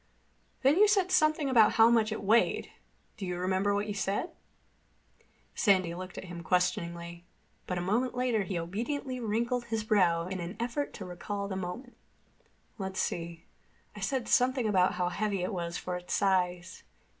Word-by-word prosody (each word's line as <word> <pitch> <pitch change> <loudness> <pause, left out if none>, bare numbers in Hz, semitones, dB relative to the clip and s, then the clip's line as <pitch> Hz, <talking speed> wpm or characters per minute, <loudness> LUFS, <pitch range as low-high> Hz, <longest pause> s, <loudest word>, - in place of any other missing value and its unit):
"Then 275 +5 +5
you 425 +2 +7
said 390 -3 +2
something 310 -4 +3
about 230 -5 +5
how 225 +1 +6
much 225 -2 +3
it 215 - -4
weighed. 220 +4 +2 0.5
Do 195 - -5
you 180 0 -3
remember 190 +3 +1
what 205 +1 0
you 210 - -3
said?" 200 - -2 1.2
Sandy 185 -5 +2
looked 185 +1 -8
at - - -5
him 175 -2 -8
questioningly, 170 0 -1 0.4
but 180 - -2
a - - -1
moment 230 +7 0
later 250 -3 +1
he 190 -2 -3
obediently 245 - -3
wrinkled 235 +2 -1
his 225 -2 -2
brow 180 -6 +2
in 185 +1 -4
an 175 +4 -6
effort 245 +5 -2
to 195 - -7
recall 200 +3 -5
the 195 - -4
moment. 190 +8 -6 0.8
"Let's 190 -1 -4
see. 170 -1 -3 0.5
I - - -8
said 235 +5 -2
something 255 -2 +3
about 185 -3 +3
how 180 -1 0
heavy 195 0 -1
it 190 - -2
was 170 -2 -3
for 180 - -4
its 180 0 -3
size. 180 -2 0
200 Hz, 170 wpm, -30 LUFS, 180-235 Hz, 1.2 s, you